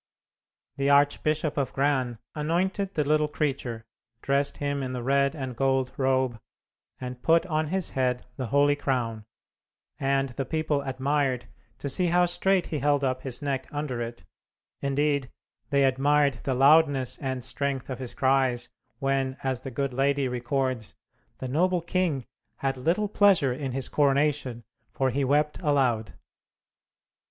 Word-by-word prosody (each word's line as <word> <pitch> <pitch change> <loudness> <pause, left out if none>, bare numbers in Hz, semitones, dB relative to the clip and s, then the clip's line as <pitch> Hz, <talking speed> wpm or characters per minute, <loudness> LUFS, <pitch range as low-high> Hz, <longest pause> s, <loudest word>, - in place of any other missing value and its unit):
The 140 0 +1
Archbishop 145 +2 +2
of 140 -2 -1
Gran 135 -4 +1 0.2
anointed 185 +6 -1
the 150 - +2
little 150 +1 +2
creature, 135 -7 -3 0.4
dressed 140 +1 0
him 145 -1 -2
in 130 -1 -3
the 125 -1 -4
red 140 +3 +2
and 130 -4 -5
gold 135 0 +1
robe, 130 -3 +1 0.6
and 125 -1 -6
put 165 +5 +4
on 155 -3 0
his 185 +2 -2
head 125 -1 0
the 130 -2 -4
holy 145 +3 +3
crown, 120 -6 -2 0.7
and 135 0 +1
the 130 +2 -3
people 155 +1 -1
admired 135 -1 0 0.3
to 140 - -5
see 175 +6 +1
how 175 +1 +4
straight 185 +1 +1
he 150 - 0
held 145 0 +2
up 130 -1 0
his 130 +1 -6
neck 135 -2 -2
under 145 -5 -3
it; 120 0 -6 0.6
indeed, 140 -1 0 0.4
they 140 -1 +3
admired 140 +2 +3
the 130 - 0
loudness 140 -1 +4
and 130 -2 -3
strength 135 0 -2
of 130 -2 -5
his 130 -2 -7
cries, 130 -2 +2 0.3
when, 135 -1 0
as 130 -2 -1
the 135 - -6
good 135 +1 -2
lady 140 +1 +1
records, 125 -1 -2 0.4
"the 130 - -5
noble 180 +7 +2
king 170 -6 -1 0.3
had 135 -1 -1
little 170 +11 0
pleasure 195 -10 +4
in 135 0 -4
his 135 0 -2
coronation, 140 -4 +1 0.3
for 135 -1 0
he 140 +3 0
wept 150 +4 +1
aloud." 130 - +1
135 Hz, 150 wpm, -27 LUFS, 130-150 Hz, 0.7 s, put